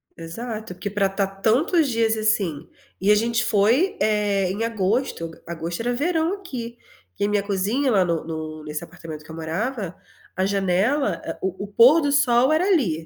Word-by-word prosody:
Exato, 215 +5 -6
porque 180 +3 -5
para 200 0 +1
estar 195 0 -1
tantos 295 - +3
dias 225 -2 +1
assim, 200 -9 0 0.3
e 195 +3 +3
a - - +7
gente 230 +2 +1
foi, 230 - +3
é, 205 -3 +1
em 205 +4 -2
agosto 215 -5 -1
agosto 170 +2 -5
era 245 +1 0
verão 325 +6 0
aqui, 255 -12 -7 0.4
que - - -3
a - - 0
minha 205 -1 +1
cozinha 210 +7 0
lá 195 -4 +4
no 170 -2 -1
no 155 -1 -6
nesse 150 +1 -5
apartamento 160 -2 -9
que 155 - -19
eu 160 - -8
morava, 185 +5 -3 0.4
a 185 - +1
janela, 200 +9 +1 0.2
o 190 +1 -3
o - - -10
pôr 240 +10 +6
do 290 -2 0
sol 260 -2 +4
era 315 +4 +3
ali. 215 - +1
210 Hz, 180 wpm, -23 LUFS, 180-245 Hz, 0.4 s, a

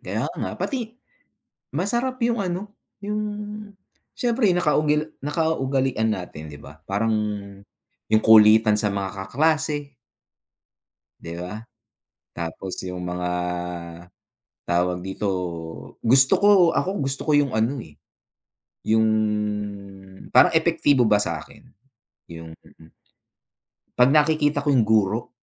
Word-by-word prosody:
Kaya - - -3
nga - - -4
pati 240 -4 -4 0.8
masarap 240 - -1
yung 235 -1 -1
ano, 190 +4 -4 0.3
yung 210 +1 -3 0.9
siyempre 235 -4 +1
nakaugil 150 -2 +1
nakaugalian 135 -6 0
natin, 80 -6 -6
di 75 - -11
ba, 75 +2 -14
parang 105 +4 -1 1.0
yung 110 - +3
kulitan 110 0 +6
sa 105 -1 +1
mga 100 -1 -3 0.2
kaklase. 145 +3 0 1.3
Di 85 - -8
ba? 90 +4 -6 0.8
Tapos 85 +2 -6
yung 90 0 -6
mga, 90 0 -3 1.4
tawag 90 +1 0
dito, 95 +2 -4 0.8
gusto 130 +3 +6
ko, 205 - +3 0.3
ako, 190 - 0 0.2
gusto 135 0 -1
ko - - +4
yung 140 -5 0
ano 115 +5 0
eh, 75 -10 -10 0.9
yung 110 0 +2 1.3
parang 125 - +7
epektibo 160 -5 +3
ba 105 -1 +3
sa'kin - - -5 0.7
yung 80 -1 -10
mm. 80 0 -20 1.1
'Pag 125 +3 +5
nakikita 150 -1 +2
ko 145 - -4
yung 130 -6 +4
guro. 110 +1 +1
130 Hz, 110 wpm, -23 LUFS, 100-155 Hz, 1.4 s, parang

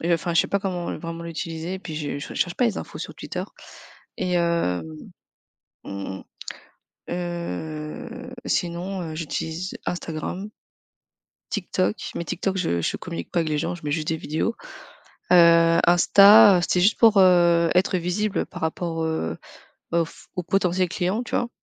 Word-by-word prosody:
et 170 - -1
heu 170 - +6
enfin, 170 +1 -2
je 165 - +5
sais - - -4
pas 200 - 0
comment 180 -3 -3
vraiment 165 0 -6
l'utiliser, 165 +2 -5
puis 160 -4 -7
je 145 -2 -3
je - - -7
recherche 175 -1 -1
pas 250 - +1
les 225 - 0
infos - - -8
sur - - -6
Twitter. - - -5 0.8
Et 180 - -1
hem, 170 - +1 1.0
mmh 100 -1 -5
mh. - - -11 0.9
Heu, 175 - -5
sinon 180 +2 -2
heu, 160 -2 -6
j'utilise 165 +3 -4
Instagram 180 +4 -4 1.0
TikTok, 190 0 0 0.2
mais 170 - -3
TikTok 190 +4 -2
je 85 - 0
je - - -1
communique 85 0 -7
pas 175 - +1
avec 160 -2 0
les 150 - 0
gens, 165 - -1
je 170 - -14
mets 145 - -2
juste 155 0 -1
des 160 - 0
vidéos. 160 +10 -2 0.8
Heu, 170 -1 +6
Insta, 200 +3 +8
heu, - - +1
c'était 180 0 +1
juste 205 +4 +3
pour, 225 -3 +6
heu, 175 -2 +5
être 185 +1 +3
visible 185 +4 -1
par - - -10
rapport, 165 0 -2
heu, 85 - -2 0.6
aux 170 0 +3
f - - -16
aux 180 - -1
potentiels 185 0 +1
clients, 190 +5 -1
tu - - -6
vois? 240 - -1
170 Hz, 170 wpm, -24 LUFS, 160-185 Hz, 1.0 s, Insta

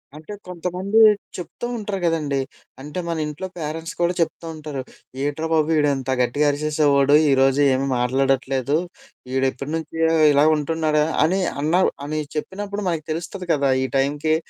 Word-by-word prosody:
అంటే 155 +6 -9
కొంతమంది 180 +4 -2 0.4
చెప్తూ 180 +6 -7
ఉంటరు 205 -3 -4
గదండీ! 150 -5 0 0.4
అంటే, 150 +5 -6
మన 165 - -1
ఇంట్లో 150 +5 -5
పేరెంట్స్ 160 +2 -5
కూడా 175 +1 +2
చెప్తూ 165 +1 -2
ఉంటరు. 150 -3 -6 0.4
ఏంట్రా 145 +3 -2
బాబు 155 0 +2
ఈడింత 140 -3 0
గట్టిగా 145 +5 +1
అరిశేసేవాడు, 145 -1 +2 0.2
ఈరోజు 135 +1 +3
ఏమీ 135 +1 0
మాట్లాడట్లేదు. 135 +2 +1 0.6
ఈడెప్పటి 135 +2 -1
నుంచి 160 0 -6 0.4
ఇలా 145 +1 +4
ఉంటున్నాడా? 155 0 0 0.2
అని 185 +5 +1 0.2
అన్నా 165 +5 +2 0.2
అని 155 +1 -2 0.2
చెప్పినప్పుడు 200 +6 -4
మనకు 160 -3 -3
తెలుస్తది 175 +3 -5
కదా! 140 -2 +1
ఈ - - 0
టైంకి, 145 +3 +1
150 Hz, 135 wpm, -22 LUFS, 140-165 Hz, 0.6 s, ఇలా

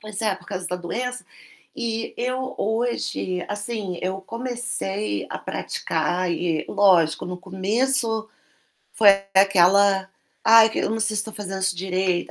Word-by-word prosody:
Pois 215 -1 -6
é, 210 -3 +1
por - - -16
causa 185 -2 -4
da 180 - -2
doença. 250 +8 -4 0.5
E 230 -2 -3
eu, 255 +2 -3
hoje, 220 -5 -2
assim, 205 -3 -4
eu 190 +1 -2
comecei 230 - -3
a - - -4
praticar 175 +3 -2
e, 165 -2 -1
lógico, 180 -6 +3
no 180 - -5
começo, 220 +5 0 0.6
foi 215 - +5 0.3
aquela: 195 0 +4 0.4
"Ai, 225 0 +7
que - - -4
eu - - 0
não 225 - -2
sei 220 -1 +1
se 210 - +4
estou 220 0 -3
fazendo 195 -2 -3
isso 190 -1 +1
direito". 185 -1 -1
200 Hz, 145 wpm, -23 LUFS, 185-225 Hz, 0.6 s, Ai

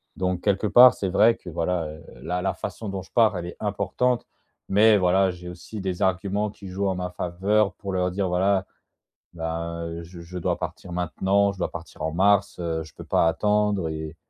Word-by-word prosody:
Donc, 90 -1 -1
quelque 100 +1 +1
part, 125 +3 +8
c'est 95 - -2
vrai 110 +5 +5
que - - -11
voilà, 85 +1 -1
heu, 75 0 -9 0.2
la 90 +1 -2
la 95 - 0
façon 110 - -6
dont 95 -1 -4
je - - -20
pars, 110 -5 +3
elle 85 - -4
est 90 - -8
importante. 110 +4 0 0.4
Mais, 105 +2 +6
voilà, 95 +1 +3
j'ai 90 -1 -8
aussi 90 +5 -8
des 95 -2 -3
arguments, 100 +3 0
qui 100 -1 -11
jouent 100 +2 -1
en 95 - 0
ma 90 0 -4
faveur, 95 +3 0
pour 100 0 -6
leur 90 0 0
dire: 95 +1 -1
«Voilà, 95 +2 +2 0.7
ben, 85 0 -4
heu, 85 0 -6
je 85 +1 -11
je 85 +2 -10
dois 85 - -1
partir 90 - -6
maintenant, 95 +3 +1
je 100 - -14
dois 90 - -1
partir 85 -2 -9
en 80 0 -1
mars, 100 +2 +2
heu, 80 -2 -2
je 80 - -15
peux - - -10
pas - - +2
attendre 105 0 +1
et» 80 0 -6
95 Hz, 210 wpm, -25 LUFS, 85-100 Hz, 0.7 s, part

